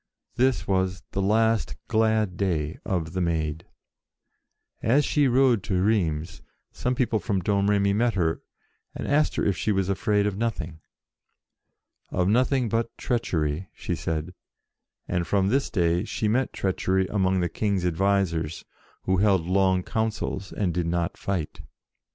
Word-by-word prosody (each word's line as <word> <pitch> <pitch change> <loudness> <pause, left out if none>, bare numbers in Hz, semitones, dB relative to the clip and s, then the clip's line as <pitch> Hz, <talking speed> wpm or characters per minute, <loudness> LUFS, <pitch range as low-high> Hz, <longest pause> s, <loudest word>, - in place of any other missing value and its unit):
This 130 +1 +1
was 95 -1 0
the 100 - -1
last 110 +2 +2
glad 110 -4 +2
day 85 -5 -1
of 85 -3 -2
the 95 - -1
Maid. 80 -1 -1 1.1
As 135 +6 +3
she 145 -2 +2
rode 125 -3 +4
to 95 -3 0
Rheims, 90 -5 0 0.3
some 125 0 -2
people 120 -3 +1
from 100 -4 -1
Domremy 100 +1 +2
met 115 +2 +1
her 80 -4 0 0.5
and - - -5
asked 150 +2 +2
her - - 0
if 100 - +2
she 105 - -1
was 95 -2 0
afraid 105 +1 +1
of 105 -2 -1
nothing. 90 -9 -3 0.7
" - - -50
Of 90 - +3
nothing 125 +3 +2
but 115 +1 -2
treachery," 90 -7 -1
she - - -4
said, 80 0 -3 0.7
and, 90 -2 -1
from 95 +1 +2
this 135 +5 +1
day, 85 -1 +1
she 110 -1 -2
met 125 +5 +1
treachery 95 0 0
among 95 -1 +1
the 90 - +1
King's 100 -1 -1
advisers, 90 -3 0 0.4
who 95 0 +1
held 95 -3 +3
long 95 0 +2
councils, 110 -3 -2
and 95 -5 -1
did 85 0 -1
not 85 0 -1
fight. 90 -6 -3
95 Hz, 150 wpm, -25 LUFS, 90-110 Hz, 1.1 s, rode